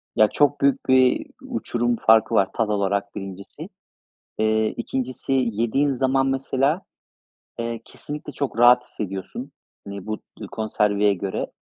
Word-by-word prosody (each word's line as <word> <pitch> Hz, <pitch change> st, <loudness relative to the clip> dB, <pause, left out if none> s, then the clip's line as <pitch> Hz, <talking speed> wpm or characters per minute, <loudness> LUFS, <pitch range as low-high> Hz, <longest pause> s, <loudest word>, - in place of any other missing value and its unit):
Ya, 110 Hz, -, +6 dB
çok 145 Hz, +4 st, +2 dB
büyük 140 Hz, 0 st, +2 dB
bir 130 Hz, -1 st, +4 dB, 0.2 s
uçurum 120 Hz, 0 st, -1 dB
farkı 110 Hz, -1 st, +4 dB
var 95 Hz, -, +3 dB
tat 110 Hz, -2 st, 0 dB
olarak 100 Hz, -1 st, -1 dB
1'incisi, 95 Hz, 0 st, -8 dB, 0.7 s
eee, 110 Hz, 0 st, +2 dB
2'ncisi, 130 Hz, +1 st, -3 dB
yediğin 125 Hz, +3 st, +1 dB
zaman 135 Hz, +1 st, +1 dB
mesela, 135 Hz, +5 st, 0 dB, 0.8 s
eee, 115 Hz, 0 st, -3 dB
kesinlikle 150 Hz, +1 st, -8 dB
çok 140 Hz, -5 st, -3 dB
rahat 125 Hz, +1 st, +7 dB
hissediyorsun, 95 Hz, -5 st, -6 dB, 0.3 s
hani, 100 Hz, -1 st, -7 dB
bu 110 Hz, -1 st, -3 dB, 0.2 s
dü -, -, -7 dB
konserveye 105 Hz, -2 st, +1 dB
göre, 95 Hz, 0 st, -3 dB
115 Hz, 130 wpm, -23 LUFS, 105-130 Hz, 0.8 s, rahat